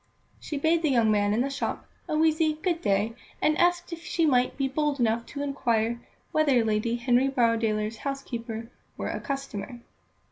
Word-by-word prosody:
She 295 Hz, -, -5 dB
bade 320 Hz, +3 st, +2 dB
the 315 Hz, -, +2 dB
young 230 Hz, -5 st, +3 dB
man 205 Hz, -1 st, +2 dB
in 220 Hz, +3 st, +2 dB
the 275 Hz, +2 st, -1 dB
shop 275 Hz, -, -3 dB, 0.2 s
a 305 Hz, -, +1 dB
wheezy 315 Hz, 0 st, +3 dB
"Good 335 Hz, +2 st, -2 dB
day," 205 Hz, +2 st, +1 dB, 0.3 s
and 305 Hz, -, +2 dB
asked 350 Hz, 0 st, +2 dB
if 335 Hz, -, -7 dB
she 345 Hz, -1 st, +1 dB
might 255 Hz, -4 st, +2 dB
be 275 Hz, -1 st, +1 dB
bold 290 Hz, +1 st, -1 dB
enough 230 Hz, 0 st, +1 dB
to 285 Hz, -, -5 dB
inquire 235 Hz, -4 st, 0 dB, 0.3 s
whether 280 Hz, -7 st, +3 dB
Lady 220 Hz, +2 st, +1 dB
Henry 245 Hz, +2 st, +2 dB
Borrowdaile's 225 Hz, -3 st, +1 dB
housekeeper 235 Hz, -4 st, -5 dB, 0.3 s
were -, -, -3 dB
a -, -, -3 dB
customer. 250 Hz, -4 st, -5 dB
255 Hz, 175 wpm, -27 LUFS, 230-305 Hz, 0.3 s, young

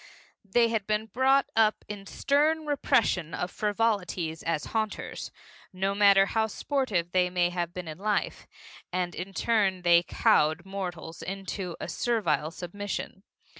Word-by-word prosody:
They 230 Hz, +4 st, +3 dB
had 220 Hz, -3 st, -1 dB
been 215 Hz, 0 st, 0 dB
brought 265 Hz, +4 st, +3 dB
up 220 Hz, -1 st, +3 dB
in 200 Hz, -1 st, -7 dB
stern 305 Hz, +6 st, +1 dB
repression 225 Hz, -, +1 dB
of 180 Hz, -, -3 dB
frivolities 200 Hz, -6 st, -1 dB
as 165 Hz, -2 st, -1 dB
haunters 220 Hz, -1 st, -3 dB, 0.4 s
no 195 Hz, +1 st, -1 dB
matter 200 Hz, -1 st, +6 dB
how 220 Hz, +2 st, 0 dB
sportive 215 Hz, -, -1 dB
they 180 Hz, 0 st, +2 dB
may 175 Hz, -1 st, +1 dB
have 175 Hz, -1 st, -2 dB
been 180 Hz, -1 st, -7 dB
in 155 Hz, +1 st, -7 dB
life 210 Hz, +1 st, -1 dB, 0.4 s
and 180 Hz, -1 st, -1 dB
in 185 Hz, +3 st, -6 dB
turn 195 Hz, -3 st, +1 dB
they 170 Hz, -1 st, +6 dB
cowed 160 Hz, -1 st, +2 dB
mortals 180 Hz, -4 st, -6 dB
into 195 Hz, -2 st, -5 dB
a -, -, -5 dB
servile 185 Hz, -11 st, 0 dB
submission. 190 Hz, +3 st, -6 dB
195 Hz, 140 wpm, -28 LUFS, 175-220 Hz, 0.4 s, matter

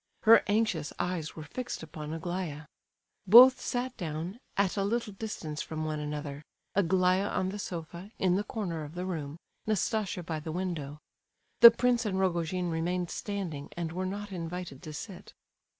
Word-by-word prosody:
Her 225 Hz, +1 st, +8 dB
anxious 205 Hz, -8 st, +1 dB
eyes 175 Hz, -3 st, -2 dB
were 155 Hz, -, -7 dB
fixed 245 Hz, +3 st, -5 dB
upon 155 Hz, -1 st, -7 dB
Aglaya. 165 Hz, -2 st, -4 dB, 0.6 s
Both 250 Hz, +6 st, +10 dB
sat 245 Hz, +1 st, -2 dB
down, 170 Hz, +5 st, -4 dB, 0.2 s
at 195 Hz, -2 st, +2 dB
a 200 Hz, -, 0 dB
little 220 Hz, +1 st, -1 dB
distance 185 Hz, -8 st, -5 dB
from 155 Hz, 0 st, -4 dB
one 155 Hz, -1 st, -2 dB
another—Aglaya 165 Hz, +6 st, -1 dB
on 185 Hz, -, -1 dB
the 205 Hz, +2 st, -5 dB
sofa, 175 Hz, +1 st, -6 dB
in 185 Hz, -2 st, +2 dB
the 200 Hz, -, +1 dB
corner 180 Hz, -8 st, -4 dB
of 150 Hz, +3 st, -9 dB
the 180 Hz, +1 st, -3 dB
room, 155 Hz, -5 st, -4 dB, 0.3 s
Nastasia 215 Hz, -3 st, 0 dB
by 160 Hz, -1 st, -3 dB
the 155 Hz, +1 st, -6 dB
window. 160 Hz, -5 st, -3 dB, 0.6 s
The 235 Hz, -, +13 dB
prince 240 Hz, +1 st, +1 dB
and 190 Hz, -2 st, -1 dB
Rogojin 180 Hz, -1 st, 0 dB
remained 175 Hz, +2 st, -1 dB
standing, 185 Hz, -9 st, -4 dB
and 170 Hz, -2 st, -2 dB
were 185 Hz, +2 st, -2 dB
not 205 Hz, +2 st, -5 dB
invited 170 Hz, -4 st, -5 dB
to 155 Hz, -, -8 dB
sit. 180 Hz, +4 st, -8 dB
180 Hz, 160 wpm, -30 LUFS, 160-200 Hz, 0.6 s, The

